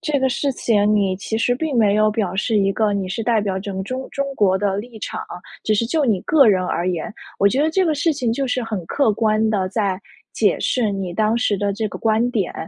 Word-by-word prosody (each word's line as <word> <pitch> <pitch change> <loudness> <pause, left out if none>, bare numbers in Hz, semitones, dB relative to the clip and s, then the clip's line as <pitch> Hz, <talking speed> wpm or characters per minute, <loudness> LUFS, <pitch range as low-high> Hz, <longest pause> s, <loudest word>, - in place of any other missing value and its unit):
这 300 -2 0
个 265 - +2
事 280 +3 0
情 210 -4 +2
你 195 -3 +1
其 220 +3 -4
实 245 +2 +1
并 290 +1 -2
没 210 -3 +4
有 215 0 +3
表 205 -4 -2
示 215 +3 0
一 195 -1 +2
个 215 +1 +1
你 195 -2 -2
是 225 +5 -3
代 225 0 +2
表 195 -2 -2
整 190 0 -5
中 260 +5 -5
中 275 - -2
国 190 -5 +3
的 195 -1 0
立 230 +1 -8
场， - - -5 0.4
只 215 - +2
是 220 - +1
就 300 +6 0
你 205 -5 +1
个 295 -4 +4
人 185 -3 +2
而 175 0 -1
言。 175 +1 -3 0.3
我 200 - +4
觉 265 +7 +1
得 315 - +2
这 375 +4 +2
个 320 -3 +1
事 310 +3 +1
情 250 -5 -1
就 270 +3 -1
是 250 -1 -1
很 215 -6 -4
客 275 -7 +1
观 215 0 +1
地 190 -3 0
在 195 -2 -1 0.3
解 - - +1
释 235 -5 0
你 195 -3 -4
当 215 +4 +1
时 235 -3 +1
的 205 +1 0
这 215 +2 -2
个 - - -8
观 225 +2 +1
点。 210 -7 -1
215 Hz, 270 characters per minute, -20 LUFS, 200-245 Hz, 0.4 s, 没